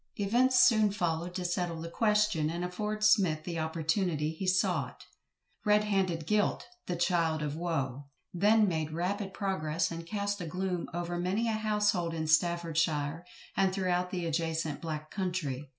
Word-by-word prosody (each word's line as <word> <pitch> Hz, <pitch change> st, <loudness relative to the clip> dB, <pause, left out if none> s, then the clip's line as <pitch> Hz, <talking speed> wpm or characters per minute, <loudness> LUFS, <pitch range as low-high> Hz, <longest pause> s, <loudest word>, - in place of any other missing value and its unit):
Events 245 Hz, +6 st, +3 dB
soon 215 Hz, -3 st, +6 dB
followed 175 Hz, -3 st, -2 dB
to 180 Hz, -1 st, -3 dB
settle 175 Hz, -2 st, -1 dB
the 165 Hz, -, -5 dB
question, 210 Hz, -5 st, +2 dB
and 170 Hz, +2 st, -3 dB
afford 210 Hz, +4 st, -3 dB
SMITH 190 Hz, -8 st, +4 dB
the 170 Hz, -1 st, -4 dB
opportunity 160 Hz, 0 st, 0 dB
he 175 Hz, +4 st, -5 dB
sought. 185 Hz, 0 st, 0 dB, 0.6 s
"Red 210 Hz, 0 st, +4 dB
handed 190 Hz, -6 st, 0 dB
guilt, 210 Hz, -1 st, +1 dB, 0.2 s
the 180 Hz, -, -1 dB
child 165 Hz, -3 st, +1 dB
of 150 Hz, 0 st, -3 dB
woe" 140 Hz, -5 st, -3 dB, 0.3 s
then 210 Hz, +4 st, +4 dB
made 160 Hz, -3 st, -2 dB
rapid 195 Hz, +4 st, -2 dB
progress, 170 Hz, -5 st, -1 dB
and 165 Hz, 0 st, -5 dB
cast 205 Hz, 0 st, -2 dB
a 170 Hz, -, -4 dB
gloom 180 Hz, +1 st, -2 dB
over 175 Hz, 0 st, -3 dB
many 195 Hz, +6 st, 0 dB
a -, -, +1 dB
household 210 Hz, -5 st, 0 dB
in 160 Hz, -1 st, -2 dB
Staffordshire, 165 Hz, -1 st, +1 dB, 0.3 s
and 195 Hz, -1 st, +3 dB
throughout 180 Hz, -1 st, 0 dB
the 180 Hz, -2 st, -3 dB
adjacent 160 Hz, -2 st, -2 dB
"black 155 Hz, -2 st, -5 dB
country." 160 Hz, -8 st, -3 dB
175 Hz, 155 wpm, -30 LUFS, 160-200 Hz, 0.6 s, soon